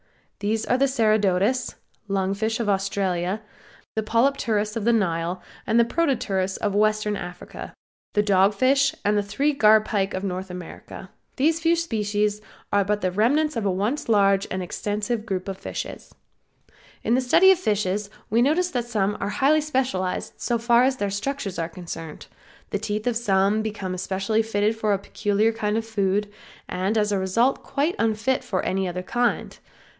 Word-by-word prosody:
These 215 +2 -1
are 250 - +1
the 275 - +4
Ceratodus, 215 -1 +1 0.3
lung 195 -1 0
fish 220 +3 -1
of 230 - -1
Australia; 195 0 -1 0.5
the 220 - 0
Polypterus 220 -2 +1
of 225 - -2
the 235 - +4
Nile, 175 -4 0 0.2
the 230 +1 +4
Protopterus 235 - 0
of 205 -2 -1
Western 215 0 +2
Africa, 180 -2 -8 0.4
the 210 - +3
Dogfish 215 +8 +3
and 205 +1 +3
the 205 - +3
three 245 +9 0
Garpike 215 -5 +3
of 185 - -4
North 190 0 -3
America. 180 -1 -9 0.2
These 315 +4 +2
few 335 +1 +3
species 210 -9 -1 0.3
are 200 0 +4
but 205 +1 -1
the 185 - 0
remnants 280 +10 +2
of 220 -3 -1
a - - +2
once 210 +10 -2
large 200 -2 +3
and 185 0 -3
extensive 210 +5 -2
group 190 -2 -3
of 195 -1 -5
fishes. - - -7 0.9
In 230 - +1
the 255 - +3
study 350 +10 +6
of 375 - +3
fishes 205 - -1 0.2
we 230 +2 +4
notice 340 +7 +2
that 245 -2 -1
some 210 -3 0
are 200 - -2
highly 290 +7 +3
specialized 255 -11 -1
so 240 - 0
far 235 +1 +4
as 260 0 +2
their 205 -3 -1
structures 200 -2 -3
are 165 0 -2
concerned; 165 -2 -8 0.5
the 205 - -1
teeth 215 0 -3
of 245 -2 +1
some 205 -2 +2
become 205 -4 -4
especially 195 +4 0
fitted 215 0 0
for 215 -2 0
a - - +2
peculiar 205 +2 0
kind 215 -1 -1
of 225 - -2
food, 205 -2 0 0.4
and 190 +4 -1
as 210 -1 +2
a 200 - +1
result 230 +8 +1
quite 295 +5 -1
unfit 225 +4 +1
for 185 - -2
any 190 0 0
other 180 +1 -4
kind. 240 +5 -1
210 Hz, 170 wpm, -24 LUFS, 195-235 Hz, 0.9 s, study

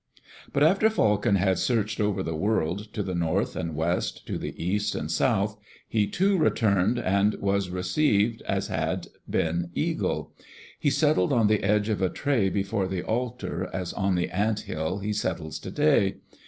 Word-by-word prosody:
But 140 - +2
after 195 +7 +5
Falcon 105 - +2
had 95 -1 +2
searched 110 -3 0
over 100 -2 0
the 80 -2 -3
world, 100 +2 -1
to 105 - -2
the 95 - -4
north 85 +4 0
and 85 -3 -3
west, 80 -6 -1
to - - -3
the - - -5
east 105 +4 -1
and 75 - -3
south, 105 0 +1 0.3
he 105 -2 +1
too 195 - +2
returned 105 - +2
and 100 -1 +2
was 100 -1 0
received 105 +3 +1
as - - 0
had - - -2 0.2
been 85 +2 0
Eagle. - - -1 0.5
He 145 - +2
settled 140 - +2
on 120 -4 +3
the 105 0 +3
edge 105 +1 +2
of 105 -3 -1
a 95 - +2
tray 125 -7 +1
before 100 0 -1
the 95 -1 -3
altar, 120 +1 -3
as 90 -2 -4
on 95 -2 0
the 90 0 0
ant 105 +3 0
hill 80 +4 -3
he 105 +1 -2
settles 85 -6 -3
today. 145 - +2
100 Hz, 170 wpm, -26 LUFS, 90-110 Hz, 0.5 s, after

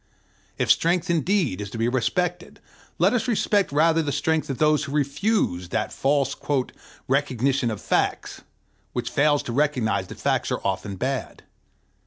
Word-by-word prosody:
If - - +2
strength 170 +1 +2
indeed 165 - +1
is 105 - -5
to 115 - -7
be 115 +1 +1
respected, 175 +8 -1 0.4
let - - +3
us 250 +1 0
respect 205 - +1
rather 160 +3 +3
the 145 -2 -2
strength 155 +3 0
of 135 - -3
those 155 -1 +2
who 140 - -7
refuse 140 - 0
that 110 +2 -2
false 140 -1 +1 0.7
"recognition 135 -1 +1
of 110 - -4
facts" - - -1 0.5
which 120 -1 -3
fails 145 0 +2
to 120 - -5
recognize 135 -5 0
that - - -10
facts - - 0
are - - 0
often 100 -1 -2
bad. 130 +6 -4
145 Hz, 155 wpm, -24 LUFS, 125-165 Hz, 0.7 s, let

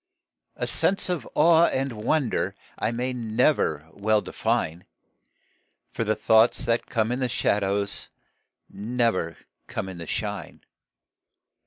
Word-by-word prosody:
A - - -2
sense 195 -1 +3
of 170 -9 -3
awe 165 +2 +6
and 135 0 -1
of 110 - -8
wonder 130 +2 0 0.2
I 110 - +1
may 125 +2 -2
never 110 -9 +1
well 105 +1 +2
define, 85 -4 -2 1.1
For - - -2
the 110 0 +1
thoughts 110 +2 +4
that 115 0 0
come 115 -2 0
in 125 - -1
the 130 -1 0
shadows 100 -2 0 0.6
Never 115 -6 -1 0.3
come - - -4
in 95 -2 -8
the 85 - -7
shine. - - -4
115 Hz, 130 wpm, -25 LUFS, 100-125 Hz, 1.1 s, awe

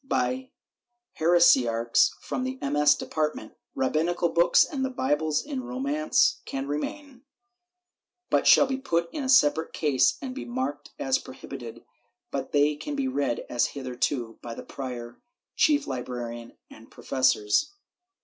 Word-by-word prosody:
by 260 -1 -1 0.7
heresiarchs 130 -9 +4
from 255 - -3
the 260 +1 -4
MS. 145 +1 +3
department. 150 -8 -3 0.2
Rabbinical 165 +6 0
books 170 +1 +4
and 275 -3 -4
Bibles 155 - 0
in 275 -3 -4
Romance 280 +5 +1
can 135 0 -4
remain, 255 - -5 1.1
but - - +2
shall - - +7
be 265 0 -2
put 170 -8 -1
in 295 - -3
a 260 - -3
separate 160 - +4
case 130 -4 +2
and 260 -2 -6
be - - -6
marked 130 +4 -4
as 135 -1 +1
prohibited, - - -10 0.5
but - - -4
they 145 +1 +3
can 290 - -5
be 275 -2 -1
read 140 - -1
as 120 - +1
hitherto, 125 -2 -3
by 115 -1 -7
the - - -8
prior, 120 -3 -7 0.3
chief 295 -1 +3
librarian 120 -2 -6
and 115 +1 -15
professors. 130 - +1
150 Hz, 135 wpm, -26 LUFS, -, 1.1 s, shall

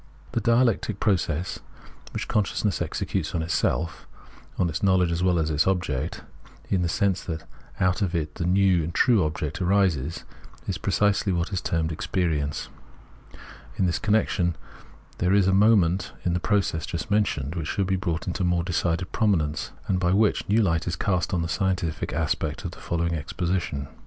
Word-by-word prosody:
This - - -1
dialectic 115 -3 +2
process 90 -4 0 0.5
which - - -4
consciousness 105 -1 0
executes 90 -3 -2
on 80 - 0
itself 80 0 -1 0.3
— - - -24
on 90 - +2
its 80 0 -3
knowledge 95 -3 +3
as 85 +1 -1
well 90 -1 +3
as 80 -1 0
on - - -1
its 75 - +3
object 90 -9 -1 0.2
— - - -24
in 95 - +2
the 85 - 0
sense 95 +3 +1
that 80 -2 -4 0.4
out 90 +2 +2
of 95 -3 0
it 75 -2 -2
the 85 - -3
new 95 -2 +3
and 85 +2 -5
true 115 -7 +4
object 75 +1 -3
arises, 90 -6 +1 0.4
is - - -2
precisely 105 -1 +1
what 85 +3 -1
is 90 - 0
termed 80 -1 -1
Experience. 75 -3 -1 1.1
In 95 - +2
this 90 - 0
connection, 105 -5 +1 0.6
there 90 +2 +3
is 100 -2 +4
a 95 - +3
moment 95 -3 +3
in 90 - +2
the 90 - +1
process 95 -5 0
just 90 +6 -4
mentioned 80 -9 +1
which 85 -4 -3
should 100 - 0
be 95 +1 +1
brought 85 -3 -2
into 90 +1 -2
more 90 -1 +1
decided 85 0 -1
prominence, 85 -10 +1 0.2
and 95 -2 +1
by 90 0 +2
which 105 +1 +3
a - - -2
new 110 +1 +4
hght 80 -3 0
is 85 - -1
cast 90 -2 0
on 90 -3 0
the - - -2
scientific 85 -2 -1
aspect 80 -2 -2
of - - -3
the - - -13
following 85 0 -1
exposition. 85 -2 -2
90 Hz, 185 wpm, -25 LUFS, 80-95 Hz, 1.1 s, true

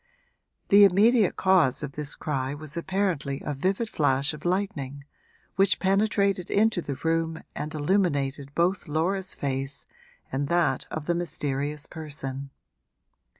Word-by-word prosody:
The 200 +1 +8
immediate 205 +2 +5
cause 185 -9 +3
of - - -4
this 150 0 -2
cry 135 -2 -2
was 150 0 -8
apparently 170 -6 -1
a 150 - -2
vivid 190 - -1
flash 140 -4 +1
of 150 +1 -10
lightning, 175 -8 -2 0.5
which 195 +1 +4
penetrated 195 -1 +1
into 210 -3 +2
the 140 -4 -4
room 165 +2 -1
and 150 +1 -4
illuminated 145 -5 0
both 175 +2 +1
Laura's 180 +5 0
face 135 0 -3 0.5
and 140 +2 -1
that 160 -5 +1
of 155 -1 -5
the 175 - +1
mysterious 145 -3 -2
person. 140 -4 -6
160 Hz, 130 wpm, -26 LUFS, 140-190 Hz, 0.5 s, The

